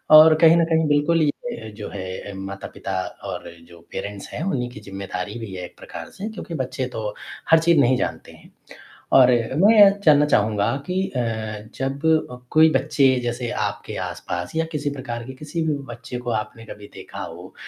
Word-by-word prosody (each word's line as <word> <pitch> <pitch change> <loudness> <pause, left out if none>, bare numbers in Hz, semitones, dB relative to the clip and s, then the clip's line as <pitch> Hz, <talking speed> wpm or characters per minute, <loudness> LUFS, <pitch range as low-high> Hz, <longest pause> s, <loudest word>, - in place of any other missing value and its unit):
और 155 +1 +10
कहीं 165 0 +8
न 165 - +4
कहीं 160 -1 +2
बिल्कुल 150 +3 +3
ये 150 - -2
जो 105 - -6
है 95 0 -6
माता-पिता 95 0 -7 0.4
और - - -6 0.2
जो 85 0 -15
पेरेंट्स 100 -1 -6
हैं, - - -6
उन्हीं 130 -10 -1
की 120 - -10
ज़िम्मेदारी 100 +1 -6
भी 105 -4 -7
है 90 - -6
एक - - -14
प्रकार - - -9
से 205 +3 -6
क्योंकि 210 -6 -8
बच्चे 130 -1 -2
तो 105 -1 -3 0.4
हर 165 - +7
चीज़ 165 -1 +4
नहीं 130 -1 +4
जानते - - -4
हैं - - -17 0.7
और 130 -1 +8
मैं 130 - +3
ये 200 -1 +10
जानना 150 -2 +6
चाहूँगा 105 0 +2
कि 185 +1 0
अ, 135 - -5 0.6
जब 135 +3 -3 0.2
अ, 125 - -7
कोई 160 +1 +6
बच्चे 135 0 +3 0.2
जैसे 120 0 -2 0.2
आपके - - -6
आसपास 90 0 -5
या 165 - +2
किसी 145 -1 -1
प्रकार 120 -4 -5
के 130 - -7
किसी 150 +5 -4
भी 150 -2 +1 0.2
बच्चे 125 +1 -7
को 120 0 -4
आपने 110 +1 -3
कभी 105 -1 -10
देखा - - -9
हो, - - -9
130 Hz, 185 wpm, -23 LUFS, 105-155 Hz, 0.7 s, और